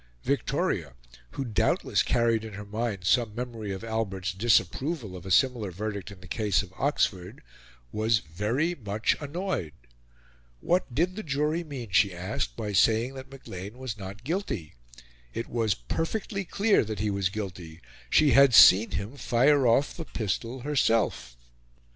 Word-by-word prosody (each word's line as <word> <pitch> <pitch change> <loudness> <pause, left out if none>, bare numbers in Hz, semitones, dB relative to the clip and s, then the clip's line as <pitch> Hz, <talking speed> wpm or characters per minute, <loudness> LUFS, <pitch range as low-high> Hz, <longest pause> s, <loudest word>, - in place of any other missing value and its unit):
Victoria, - - -1 0.4
who 135 - -3
doubtless 110 -5 +1
carried 115 -2 +1
in 110 -2 -8
her 105 +1 -7
mind 105 -2 -3
some 115 +1 +2
memory 115 -4 -5
of 95 +2 -6
Albert's 100 -5 -2
disapproval 120 - 0
of 90 +1 -9
a - - -5
similar 120 0 +2
verdict 100 +2 -5
in 100 -3 -12
the 95 - -12
case 105 0 +1
of 95 -2 -13
Oxford, 95 -10 -1 0.5
was 110 +1 +2
very 110 - -1
much 110 - -1
annoyed. 150 - -3 0.9
What 175 - 0
did 180 +4 +1
the 215 - -4
jury 150 +1 -1
mean, 130 - -7
she 100 -1 +3
asked, 85 -9 -3
by 105 -1 -4
saying 115 +6 +3
that 130 0 -9
Maclean 105 -5 -9
was 130 -4 -5
not 100 +2 -9
guilty? 140 - -3 0.6
It 115 - -3
was 115 -3 0
perfectly 190 - -3
clear 205 +4 +2
that 110 -1 -5
he 105 +2 -1
was 100 -1 0
guilty 90 -6 -7 0.3
she 150 - +5
had 135 -3 +6
seen 100 +5 +8
him 105 +8 -4
fire 135 +2 +3
off 125 +5 +2
the 165 - -6
pistol 115 +3 -3
herself. 115 - 0
110 Hz, 155 wpm, -27 LUFS, 100-135 Hz, 0.9 s, seen